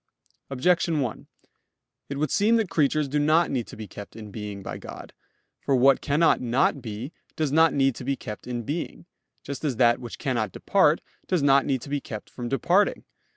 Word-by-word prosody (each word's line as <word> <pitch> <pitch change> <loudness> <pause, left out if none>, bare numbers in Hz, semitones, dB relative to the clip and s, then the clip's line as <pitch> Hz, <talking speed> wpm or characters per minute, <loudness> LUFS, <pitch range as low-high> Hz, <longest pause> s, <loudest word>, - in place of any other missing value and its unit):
Objection 165 +4 +2
1: 125 -5 -4 0.8
It 140 - -4
would 150 -1 -1
seem 215 +3 +3
that 220 -6 0
creatures 150 -2 +2
do 145 +2 0
not 155 +3 +3
need 125 -4 -2
to - - -10
be 110 -1 -7
kept 100 +3 -10
in 110 -2 -9
being 105 -2 -6
by - - -5
God. - - -10 0.5
For 135 - +1
what 135 +2 +5
cannot 155 +3 +3
not 130 +3 +1
be, 115 +6 -6 0.2
does 155 -3 -1
not 160 +2 +5
need 135 -1 +2
to - - -7
be 140 - 0
kept 105 -3 -8
in 120 -1 -3
being; 160 +7 -5 0.4
just 140 +2 -6
as 140 -5 0
that 120 0 +4
which 120 -2 -8
cannot 120 -8 -1
depart, - - +3 0.3
does 180 -6 +1
not 140 -1 +4
need 130 -4 0
to - - -9
be 145 0 -1
kept 110 -3 -8
from 120 -1 -5
departing. 175 +9 +2
135 Hz, 200 wpm, -25 LUFS, 120-155 Hz, 0.8 s, what